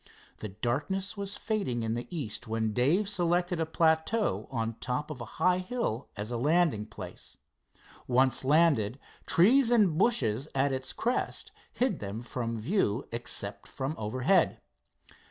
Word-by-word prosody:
The 110 Hz, -, -5 dB
darkness 145 Hz, -, -2 dB
was 200 Hz, 0 st, -3 dB
fading 165 Hz, -, -1 dB
in 110 Hz, 0 st, -1 dB
the 120 Hz, +1 st, -4 dB
east 125 Hz, -, -4 dB
when 110 Hz, -1 st, -1 dB
Dave 150 Hz, -, +2 dB
selected 175 Hz, -2 st, +1 dB
a 160 Hz, -, 0 dB
plateau 160 Hz, +7 st, +1 dB
on 115 Hz, -4 st, -1 dB
the 115 Hz, -, -9 dB
top 130 Hz, +4 st, -3 dB
of 135 Hz, -5 st, -7 dB
a -, -, -4 dB
high 185 Hz, 0 st, +3 dB
hill 185 Hz, -, -3 dB
as 105 Hz, +3 st, -4 dB
a 120 Hz, -, -1 dB
landing 145 Hz, -5 st, +2 dB
place. -, -, -10 dB, 0.7 s
Once 130 Hz, +1 st, +3 dB
landed, 140 Hz, -6 st, +3 dB, 0.3 s
trees 230 Hz, +8 st, +5 dB
and 205 Hz, -9 st, +4 dB
bushes 135 Hz, -, +2 dB
at 135 Hz, +1 st, +2 dB
its 130 Hz, 0 st, -2 dB
crest 245 Hz, +2 st, -2 dB, 0.2 s
hid 255 Hz, 0 st, 0 dB
them 105 Hz, +3 st, -5 dB
from 115 Hz, -1 st, -3 dB
view 120 Hz, -, 0 dB
except 120 Hz, +1 st, -3 dB
from 135 Hz, +3 st, -3 dB
overhead. 130 Hz, -, +1 dB
140 Hz, 150 wpm, -29 LUFS, 115-180 Hz, 0.7 s, trees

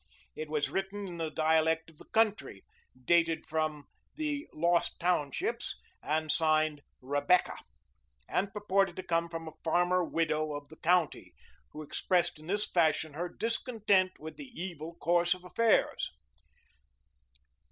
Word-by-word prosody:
It 155 Hz, -, -5 dB
was 150 Hz, -1 st, 0 dB
written 195 Hz, +1 st, -3 dB
in 175 Hz, -2 st, -7 dB
the 165 Hz, -1 st, -2 dB
dialect 160 Hz, +1 st, +2 dB
of 155 Hz, -, -24 dB
the -, -, -12 dB
country, 205 Hz, -, +1 dB, 0.4 s
dated 165 Hz, 0 st, +3 dB
from 155 Hz, -2 st, -1 dB, 0.3 s
the 300 Hz, -1 st, -2 dB
"Lost 170 Hz, +2 st, +1 dB
Townships," 160 Hz, -6 st, 0 dB, 0.3 s
and 155 Hz, 0 st, 0 dB
signed 155 Hz, -2 st, +2 dB, 0.2 s
"Rebecca," 145 Hz, +7 st, +2 dB, 0.7 s
and 195 Hz, +2 st, 0 dB
purported 195 Hz, -3 st, +1 dB
to 185 Hz, -, -5 dB
come 170 Hz, 0 st, 0 dB
from 165 Hz, -1 st, -6 dB
a -, -, -6 dB
farmer 175 Hz, +2 st, +2 dB
widow 155 Hz, -2 st, 0 dB
of 145 Hz, 0 st, -7 dB
the 160 Hz, -, -13 dB
county, 175 Hz, -2 st, +1 dB, 0.3 s
who 155 Hz, -, -8 dB
expressed 175 Hz, +2 st, 0 dB
in 155 Hz, -, -13 dB
this 205 Hz, +3 st, +1 dB
fashion 160 Hz, -3 st, +1 dB
her 175 Hz, +4 st, -3 dB
discontent 215 Hz, -5 st, +1 dB
with 160 Hz, +1 st, -9 dB
the 280 Hz, -3 st, -9 dB
evil 170 Hz, -2 st, -6 dB
course 175 Hz, +1 st, +2 dB
of 180 Hz, -, -15 dB
affairs. 225 Hz, +5 st, +2 dB
170 Hz, 140 wpm, -31 LUFS, 155-185 Hz, 0.7 s, dated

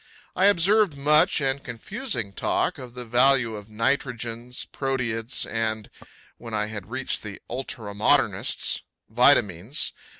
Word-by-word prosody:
I 185 Hz, -, +3 dB
observed 200 Hz, -3 st, +4 dB
much 150 Hz, +3 st, +4 dB
and 135 Hz, 0 st, 0 dB
confusing 125 Hz, -, -3 dB
talk -, -, -1 dB
of 125 Hz, -2 st, -10 dB
the 125 Hz, -1 st, -6 dB
value 120 Hz, -1 st, +3 dB
of 105 Hz, 0 st, -10 dB
nitrogens, 120 Hz, +1 st, -2 dB
proteids 120 Hz, -3 st, -2 dB
and 110 Hz, -1 st, -3 dB, 0.5 s
when 115 Hz, -2 st, -6 dB
I 105 Hz, 0 st, +1 dB
had 105 Hz, -2 st, -7 dB
reached 130 Hz, +2 st, -3 dB
the 100 Hz, -2 st, -8 dB
ultra 120 Hz, -4 st, -5 dB
modernists 105 Hz, +1 st, +2 dB, 0.3 s
vitamines. 120 Hz, -, +2 dB
120 Hz, 125 wpm, -25 LUFS, 110-135 Hz, 0.5 s, observed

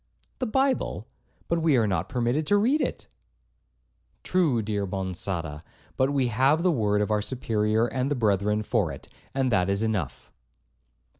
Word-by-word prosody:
'The 255 Hz, -, -1 dB
Bible?—But 260 Hz, -8 st, -2 dB
we 155 Hz, -5 st, +3 dB
are 115 Hz, -, +3 dB
not 100 Hz, -3 st, -1 dB
permitted 125 Hz, +5 st, 0 dB
to 205 Hz, -, +4 dB
read 260 Hz, +9 st, +2 dB
it.' -, -, -3 dB, 1.2 s
'True, 155 Hz, -11 st, +1 dB
dear 100 Hz, -1 st, -2 dB
Monçada, 90 Hz, -5 st, -4 dB, 0.3 s
but 130 Hz, +1 st, +2 dB
we 135 Hz, -3 st, +1 dB
have 135 Hz, +8 st, +2 dB
the 180 Hz, -, +4 dB
word 105 Hz, -7 st, +1 dB
of 105 Hz, -, -1 dB
our 105 Hz, -1 st, +2 dB
Superior 110 Hz, -2 st, 0 dB
and 125 Hz, +3 st, -2 dB
the 145 Hz, -, 0 dB
brethren 105 Hz, -2 st, +1 dB
for -, -, 0 dB
it, -, -, -10 dB, 0.3 s
and 135 Hz, -2 st, +1 dB
that 90 Hz, -3 st, +2 dB
is 100 Hz, +2 st, 0 dB
enough.' 110 Hz, -4 st, -3 dB
115 Hz, 155 wpm, -26 LUFS, 105-145 Hz, 1.2 s, to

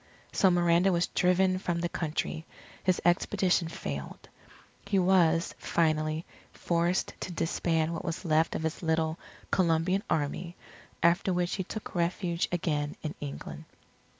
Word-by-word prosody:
So 190 Hz, -, +4 dB
Miranda 175 Hz, +1 st, +4 dB
was 175 Hz, 0 st, +2 dB
driven 185 Hz, +1 st, +2 dB
from 175 Hz, -2 st, -1 dB
the 175 Hz, -, 0 dB
country. 160 Hz, -1 st, -3 dB, 0.4 s
His 185 Hz, -1 st, +2 dB
expedition 180 Hz, 0 st, +2 dB
failed. 70 Hz, -, -6 dB, 0.6 s
He 200 Hz, 0 st, +2 dB
was, 175 Hz, -3 st, +3 dB
finally, 155 Hz, -1 st, 0 dB, 0.3 s
forced 170 Hz, +1 st, 0 dB
to 185 Hz, -, -5 dB
disband 165 Hz, -1 st, 0 dB
what 165 Hz, -, -4 dB
was 170 Hz, +1 st, -4 dB
left 160 Hz, 0 st, +2 dB
of -, -, -3 dB
his 160 Hz, 0 st, -2 dB
little 160 Hz, -1 st, 0 dB, 0.3 s
"Colombian 180 Hz, +2 st, +2 dB
Army," 170 Hz, +4 st, -1 dB, 0.5 s
after 175 Hz, +3 st, +3 dB
which 180 Hz, 0 st, 0 dB
he 190 Hz, -, -1 dB
took 215 Hz, +4 st, -7 dB
refuge 170 Hz, 0 st, 0 dB
again 150 Hz, -4 st, -1 dB
in 155 Hz, -, -3 dB
England. 70 Hz, 0 st, -7 dB
170 Hz, 135 wpm, -29 LUFS, 160-180 Hz, 0.6 s, So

